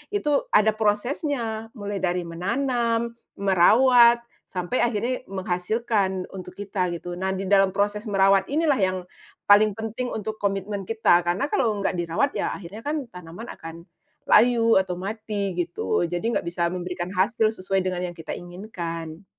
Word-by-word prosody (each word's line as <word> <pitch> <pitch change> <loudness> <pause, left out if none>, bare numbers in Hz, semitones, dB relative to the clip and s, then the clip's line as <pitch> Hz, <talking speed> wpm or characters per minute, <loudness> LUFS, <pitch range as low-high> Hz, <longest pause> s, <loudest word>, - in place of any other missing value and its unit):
itu 295 -8 +1
ada 215 +1 +4
prosesnya. 225 +1 -1
Mulai 205 -2 -4
dari 180 -1 0
menanam, 230 +6 -1 0.2
merawat, 235 +6 +5 0.2
sampai 180 +6 -2
akhirnya 240 +3 -1
menghasilkan 190 +1 -1
untuk 185 -1 -9
kita 195 -2 -2
gitu. 175 +1 -7
Nah, 190 0 -1
di 190 - -3
dalam 195 -1 +4
proses 205 +2 -1
merawat 195 -1 +3
inilah 295 -2 +1
yang 185 -1 +1 0.5
paling 205 0 +5
penting 225 +3 -4
untuk 220 0 -5
komitmen 195 -1 -2
kita. 225 -6 +4
Karena 190 +12 0
kalau 235 - +1
nggak 180 -2 -1
dirawat, 170 +12 0
ya - - -2
akhirnya 195 +3 -9
kan 285 -1 -4
tanaman 180 +5 -9
akan 165 +1 -10 0.4
layu 230 -1 +5
atau 190 -2 -2
mati 205 +1 -3
gitu. 175 0 -1
Jadi 175 +7 -2
nggak 200 - -2
bisa 170 0 -1
memberikan 180 0 -4
hasil 215 +3 +2
sesuai 190 0 0
dengan 180 -1 -2
yang 175 - -8
kita 165 -2 -7
inginkan. 175 -2 -7
200 Hz, 150 wpm, -24 LUFS, 180-225 Hz, 0.5 s, merawat